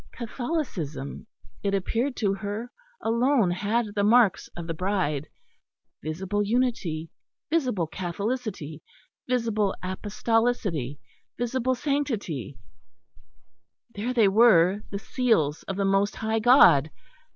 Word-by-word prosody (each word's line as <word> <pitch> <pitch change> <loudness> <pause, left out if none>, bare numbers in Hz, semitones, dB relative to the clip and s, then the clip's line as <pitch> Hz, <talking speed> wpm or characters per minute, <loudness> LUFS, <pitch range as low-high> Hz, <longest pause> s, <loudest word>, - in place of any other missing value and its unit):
Catholicism, 230 - -4 0.3
it 200 -1 0
appeared 230 +7 -1
to 200 -3 +1
her, 205 +4 -5 0.3
alone 235 -3 +2
had 210 +4 -1
the 205 -1 0
marks 225 -1 +4
of 170 - -5
the 165 - -3
Bride, 165 -5 -1 0.7
visible 185 +7 -2
unity, 205 -8 -1 0.4
visible 255 - +1
Catholicity, 185 - -4 0.5
visible 225 -5 +1
Apostolicity, 200 - -1 0.4
visible 255 +1 0
Sanctity; 230 - -2 1.4
there 215 +5 -3
they 230 -5 +4
were, 195 -2 +5
the 200 - -4
seals 200 - +1
of 195 - -3
the 200 - +1
most 195 +1 +2
High 220 0 -1
God. 215 - +6
205 Hz, 105 wpm, -26 LUFS, 180-240 Hz, 1.4 s, God